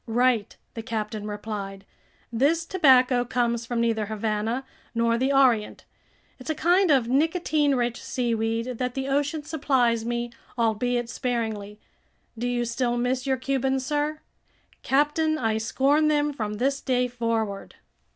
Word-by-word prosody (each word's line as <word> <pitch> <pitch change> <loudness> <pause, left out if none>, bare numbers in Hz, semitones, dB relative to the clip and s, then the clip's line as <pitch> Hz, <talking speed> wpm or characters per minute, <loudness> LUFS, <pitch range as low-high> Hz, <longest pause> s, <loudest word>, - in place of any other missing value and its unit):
"Right," 235 -2 +1 0.2
the 225 - -5
captain 215 -1 -4
replied, 205 -2 -6 0.5
"this 300 +8 +2
tobacco 260 -8 +4
comes 235 -1 -1
from 240 -1 -1
neither 225 -2 0
Havana 220 +4 -2 0.3
nor 230 0 +2
the 260 +4 +1
Orient. 255 -6 +2 0.5
It's 255 - -9
a 315 - 0
kind 355 +4 +3
of 265 -6 +4
nicotine 300 +1 +2
rich 240 -1 -1
seaweed 230 -1 -1
that 250 -1 -2
the 270 0 -2
ocean 290 +2 0
supplies 260 -7 +1
me, 240 0 -2 0.3
albeit 235 +1 0
sparingly. 220 -4 -3 0.6
Do 235 +2 -3
you 240 -1 0
still 240 +1 -1
miss 250 +2 -1
your 265 -1 +2
Cubans, 265 0 -1
sir?" 300 +2 -1 0.6
"Captain, 295 +3 +2
I 225 -4 0
scorn 280 +7 +2
them 295 -1 +1
from 215 -5 -3
this 275 +5 0
day 250 -2 +1
forward." 230 -4 -3
245 Hz, 140 wpm, -25 LUFS, 225-275 Hz, 0.6 s, tobacco